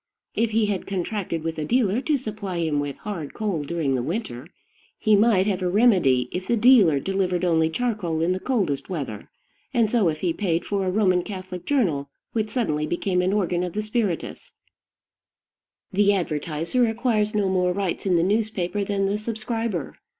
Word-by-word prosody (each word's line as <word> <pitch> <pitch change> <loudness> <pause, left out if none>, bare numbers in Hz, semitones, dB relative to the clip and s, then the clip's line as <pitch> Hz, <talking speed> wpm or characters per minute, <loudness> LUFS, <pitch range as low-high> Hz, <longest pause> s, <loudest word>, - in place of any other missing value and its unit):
If 230 +1 +1
he 220 0 +2
had 205 -3 -2
contracted 185 -3 -3
with 165 -1 -3
a - - -1
dealer 225 - +1
to 300 0 +1
supply 215 -7 -5
him 160 -3 0
with 145 -1 -3
hard 175 -9 -6
coal 200 -8 -1
during 145 -2 -1
the 130 - 0
winter, 160 - -4 0.5
he 215 -2 +3
might 205 -2 +4
have 195 -3 -1
a 180 - 0
remedy 180 - +4
if 185 +1 -4
the 235 - +2
dealer 210 - +6
delivered 185 +1 0
only 160 -2 +3
charcoal 200 -5 -1
in 175 - +2
the 185 - -1
coldest 190 - -1
weather; 140 - -5 0.5
and 225 -3 +3
so 220 -8 +3
if 155 -1 -4
he 175 -3 +1
paid 170 -2 -1
for 195 -2 -1
a - - +1
Roman 185 -3 +3
Catholic 185 -2 -7
journal 170 - +1 0.2
which 220 -2 -1
suddenly 155 - -1
became 180 +2 0
an 185 +1 +1
organ 180 -4 0
of 180 -2 -4
the 215 - -2
spiritists. 215 - -3 1.4
The 200 +1 +4
advertiser 165 - 0
acquires 225 -2 0
no 205 -2 +2
more 180 -1 +2
rights 195 0 -2
in 180 - +3
the 165 - +3
newspaper 205 -1 0
than 195 0 0
the 200 +2 0
subscriber. 225 - -3
190 Hz, 180 wpm, -24 LUFS, 170-215 Hz, 1.4 s, dealer